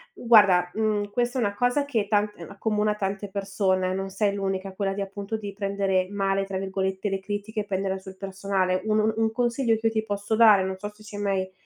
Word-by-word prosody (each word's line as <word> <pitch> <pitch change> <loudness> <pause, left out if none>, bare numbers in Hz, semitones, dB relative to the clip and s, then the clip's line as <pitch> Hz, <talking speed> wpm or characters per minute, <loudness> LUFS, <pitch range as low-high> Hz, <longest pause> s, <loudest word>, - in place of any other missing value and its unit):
mhmm, 240 - -10
guarda, 195 -6 +6
mhmm, 210 -2 0
questa 245 +3 0
è - - +1
una 200 -2 0
cosa 245 +6 +1
che 225 -8 -1
tant 210 0 +1
ehm, 170 - -9
accomuna 210 0 0
tante 200 0 -3
persone, 190 -2 0
non 195 0 -3
sei 200 +1 0
l'unica, 195 -1 -3
quella 195 0 -1
di 200 - -4
appunto, 200 +2 -4
di 205 -2 -7
prendere 195 -2 0
"male", 195 -1 0
tra 195 -1 -4
virgolette, 190 +1 -2
le 195 - -1
critiche 205 +2 -4
e 205 - -7
prenderla 195 -1 -1
sul 190 0 -11
personale. 190 -1 -1
Un 215 0 +2
un 220 +1 +2
un 225 0 +2
consiglio 240 0 +1
che 225 +1 0
io 225 - 0
ti 220 0 -1
posso 205 +1 -2
dare, 215 -4 +7
non 190 0 -2
so 205 +1 -5
se 210 - -20
ci 210 -1 -10
hai - - -4
mai 190 -2 -1
200 Hz, 230 wpm, -26 LUFS, 195-215 Hz, -, dare